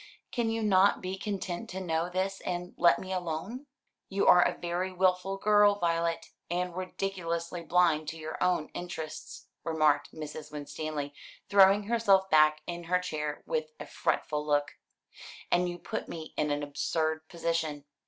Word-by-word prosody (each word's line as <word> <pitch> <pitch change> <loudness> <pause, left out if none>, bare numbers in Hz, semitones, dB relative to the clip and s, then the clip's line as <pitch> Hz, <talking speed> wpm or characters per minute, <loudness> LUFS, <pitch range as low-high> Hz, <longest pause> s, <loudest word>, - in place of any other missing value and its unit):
Can 235 -3 0
you 225 0 -1
not 200 -1 +4
be 185 +1 -4
content 195 +1 -4
to 190 - -5
know 170 -2 -1
this 190 +2 -2
and 180 0 -4
let 170 0 +5
me 190 0 -5
alone?" 185 - -4 0.4
"You 195 +1 0
are 180 - +8
a - - +1
very 175 +2 -2
wilful 185 +1 +1
girl, 205 0 +5
Violet, 170 -3 -1 0.2
and 175 0 -2
ridiculously 180 -2 -3
blind 165 -3 +2
to 165 +1 -4
your 155 +2 -4
own 180 -4 +1
interests," 165 -3 -7 0.2
remarked 155 -3 +2
Mrs. 155 -1 -8
Winstanley, 145 0 -5 0.4
throwing 200 +1 +6
herself 200 -4 +3
back 155 0 +5
in 175 -1 -5
her 180 +2 +2
chair 155 -5 -4
with 480 -1 -2
a - - -6
fretful 150 -1 -1
look, 145 -1 +1 0.8
"and 175 0 +3
you 175 - -5
put - - -5
me 160 -1 -7
in 150 - 0
an 145 0 -1
absurd 155 +2 -1
position. 165 -4 -2
175 Hz, 155 wpm, -30 LUFS, 155-190 Hz, 0.8 s, are